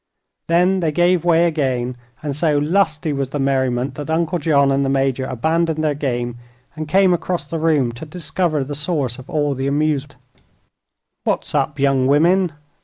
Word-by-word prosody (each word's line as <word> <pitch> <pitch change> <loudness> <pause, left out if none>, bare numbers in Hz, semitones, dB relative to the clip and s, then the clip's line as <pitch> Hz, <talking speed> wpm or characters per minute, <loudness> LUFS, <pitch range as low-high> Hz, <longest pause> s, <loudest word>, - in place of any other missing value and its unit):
Then 180 +3 +3
they 165 -3 0
gave 175 +2 +2
way 170 -1 +4
again, 130 -6 -1 0.3
and 145 -2 -3
so 150 -1 +1
lusty 155 -1 +1
was 135 -2 -2
the 145 - -3
merriment 130 -1 0
that 145 +2 -7
Uncle 170 +2 0
John 140 -3 +3
and 135 0 +1
the 135 - 0
Major 135 -1 0
abandoned 160 +4 0
their 150 -1 +1
game 120 -4 -3 0.4
and 155 -1 -5
came 190 +2 +4
across 175 -2 -2
the 165 +3 -4
room 150 -6 +2
to 120 +7 -9
discover 155 -1 -1
the 145 +2 -6
source 145 -5 -2
of 130 - -13
all 145 -2 0
this 135 +1 -3
amusement. 145 -1 0 1.1
"What's - - -1
up, - - 0
young 135 -2 +2
women?" 170 +5 +3
150 Hz, 175 wpm, -19 LUFS, 135-165 Hz, 1.1 s, way